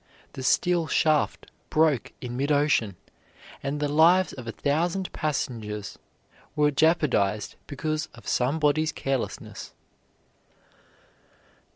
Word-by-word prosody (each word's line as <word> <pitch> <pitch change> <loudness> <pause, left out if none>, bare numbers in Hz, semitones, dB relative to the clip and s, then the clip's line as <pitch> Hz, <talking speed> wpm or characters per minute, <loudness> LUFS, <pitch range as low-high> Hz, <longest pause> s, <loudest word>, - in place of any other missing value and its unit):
The - - -7
steel 170 +5 +2
shaft 155 -2 +1 0.2
broke 155 -5 +2
in 120 -1 -5
mid 140 +4 0
ocean, 145 -9 +2 0.7
and 140 +2 -3
the 150 - 0
lives 165 +5 +4
of 125 -3 -9
a - - -2
thousand 170 - -1
passengers 110 -9 -3 0.6
were 150 -1 +3
jeopardized 135 - +1
because 155 +3 -3
of 115 - -14
somebody's 150 +4 +1
carelessness. 135 -2 -4
145 Hz, 100 wpm, -26 LUFS, 125-160 Hz, 0.7 s, lives